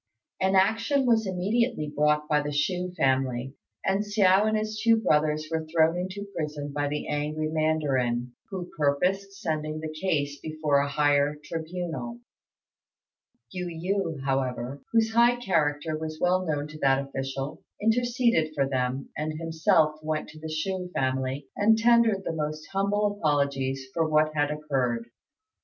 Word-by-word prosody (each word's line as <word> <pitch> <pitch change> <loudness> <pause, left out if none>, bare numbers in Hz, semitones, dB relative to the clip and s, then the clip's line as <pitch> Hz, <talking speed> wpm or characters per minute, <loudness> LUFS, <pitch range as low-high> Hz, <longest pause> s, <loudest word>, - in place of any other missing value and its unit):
An 190 +1 +3
action 225 +8 +3
was 225 -3 +3
immediately 200 0 0
brought 150 0 +2
by 150 -1 +3
the 145 0 -3
Chou 180 +5 -1
family, 130 -2 +1 0.3
and 195 +2 +2
Hsiao 205 -1 +4
and 215 0 +2
his 215 0 -3
two 230 0 +6
brothers 155 -6 +1
were 160 -1 -1
thrown 160 +1 +3
into 185 +3 -4
prison 150 -2 -4
by 145 0 0
the 150 +1 -3
angry 150 +1 -2
mandarin, 135 -6 0 0.2
who 185 -3 -6
purposed 185 +7 0
sending 155 -5 -2
the 155 0 -5
case 150 -4 -1
before 155 -2 0
a 140 0 0
higher 145 0 +2
tribunal. 160 -8 -5 1.3
Yu 180 -1 -4
yü, 165 -3 -2
however, 135 0 -2
whose 225 -1 +2
high 235 +1 +5
character 160 -8 0
was 155 0 -5
well 180 +1 +2
known 145 -1 -1
to 155 0 -10
that 135 0 +2
official, 135 +1 -4 0.2
interceded 230 - +2
for 140 -1 +1
them, 130 0 -2
and 155 +1 -2
himself 160 -1 +2
went 155 0 -2
to 155 - -12
the 160 0 -6
Chou 180 +4 -2
family 130 +1 -1
and 220 +2 +4
tendered 230 -3 +4
the 165 - -2
most 155 0 -3
humble 205 +1 +1
apologies 140 -3 0
for 160 0 +1
what 155 0 +3
had 145 -1 +1
occurred. 130 -6 -2
155 Hz, 150 wpm, -27 LUFS, 145-190 Hz, 1.3 s, two